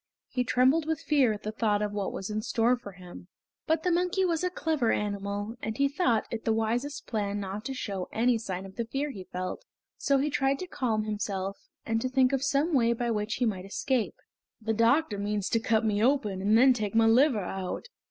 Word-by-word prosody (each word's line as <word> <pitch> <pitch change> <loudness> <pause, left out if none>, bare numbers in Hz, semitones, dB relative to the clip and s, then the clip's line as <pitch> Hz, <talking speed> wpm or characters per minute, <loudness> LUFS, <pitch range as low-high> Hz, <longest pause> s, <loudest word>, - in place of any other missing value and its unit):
He 250 - 0
trembled 260 +6 +3
with 320 -2 0
fear 280 -6 +3
at 210 -1 -5
the 215 - -3
thought 210 -2 +1
of 210 - -2
what 205 -2 -2
was 195 +2 -5
in 215 0 -1
store 230 +3 +2
for 205 -5 -10
him. 180 -1 -12 0.4
But 320 0 +1
the 360 - +2
monkey 360 +2 +1
was 335 -1 0
a 360 - +2
clever 315 -9 0
animal, 205 +2 -2
and 220 0 -4
he 280 0 +3
thought 275 -6 +1
it 225 -1 -4
the 225 - +1
wisest 235 +6 -1
plan 205 -3 -2
not 200 +1 -5
to 270 - -3
show 195 -7 -4
any 235 +1 +2
sign 190 -4 -5
of 190 - -12
the 235 - -1
fear 275 +5 -2
he 190 -6 -9
felt, 185 - -4 0.4
so 280 - +2
he 290 +2 0
tried 270 0 +1
to 370 - -5
calm 230 -10 -1
himself 200 -2 -3 0.3
and 225 0 0
to 255 - -1
think 260 0 +3
of 270 - +1
some 285 +4 +1
way 235 -4 +4
by 235 0 -1
which 210 0 -1
he 250 - 0
might 195 -5 -1
escape. 240 +3 -1 0.4
"The 225 0 -1
doctor 230 0 +2
means 205 -1 -1
to 230 - +2
cut 225 0 +1
me 210 0 +1
open 225 -8 +1
and 210 +3 +4
then 260 +2 +7
take 215 -3 -3
my 225 0 +5
liver 230 -2 +4
out! 185 0 -4
225 Hz, 225 wpm, -28 LUFS, 205-270 Hz, 0.4 s, then